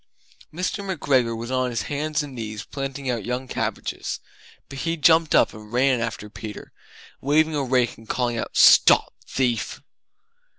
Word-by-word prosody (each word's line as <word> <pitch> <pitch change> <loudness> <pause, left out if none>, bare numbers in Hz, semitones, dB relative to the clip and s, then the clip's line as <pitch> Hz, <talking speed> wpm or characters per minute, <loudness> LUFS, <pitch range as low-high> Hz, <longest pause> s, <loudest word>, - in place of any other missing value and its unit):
Mr. 185 +5 -3
McGregor 135 -11 +1
was 120 +2 -6
on 130 -1 +1
his 115 -2 -2
hands 150 +1 -2
and 145 -2 -8
knees 110 -3 -6
planting 135 -1 -5
out 120 -4 -1
young 125 +3 -3
cabbages, - - -3 0.5
but 135 0 -8
he 165 +2 -1
jumped 160 +1 +4
up - - +4
and 105 0 -12
ran 125 0 +2
after 115 -2 -4
Peter, 105 0 -9 0.5
waving 155 +3 +2
a 145 - 0
rake 125 -3 +1
and 115 - -17
calling 120 -2 0
out 115 - -4
"Stop - - +6
thief!" 125 -3 -1
130 Hz, 160 wpm, -23 LUFS, 115-145 Hz, 0.5 s, Stop